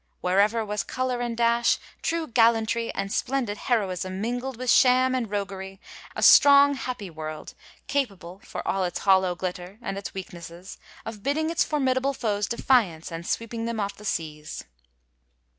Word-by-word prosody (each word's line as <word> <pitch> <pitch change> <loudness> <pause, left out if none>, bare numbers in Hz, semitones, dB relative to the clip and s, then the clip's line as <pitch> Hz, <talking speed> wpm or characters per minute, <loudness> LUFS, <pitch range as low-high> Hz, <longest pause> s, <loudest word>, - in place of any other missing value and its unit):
Everywhere 205 +5 +2
was 210 0 -2
color 255 -1 -2
and 235 -1 -3
dash, 235 0 +3 0.2
true 330 -1 -1
gallantry 230 -2 +2
and 195 0 -3
splendid 245 -6 -1
heroism 185 -6 -1
mingled 245 +3 -3
with 255 0 0
sham 255 0 +5
and 245 -4 -1
roguery, 195 -1 -5 0.2
— - - -17
a - - -2
strong, 285 0 +8
happy 250 -8 -5
world, 155 -1 -7 0.3
capable, 200 -10 -3
for - - -7
all 195 0 0
its 175 -1 -2
hollow 190 -2 +3
glitter, 180 +2 -5
and 200 -5 -4
its 200 - -7
weaknesses, 175 -1 -9 0.3
of 220 -2 -7
bidding 310 +6 0
its 335 - +2
formidable 270 -2 0
foes 210 -5 -1
defiance 205 -9 +1
and 165 +1 -6
sweeping 230 0 -3
them 230 -1 -3
off 200 -1 -2
the 210 - -14
seas. 155 -5 -4
220 Hz, 160 wpm, -25 LUFS, 190-250 Hz, 0.3 s, strong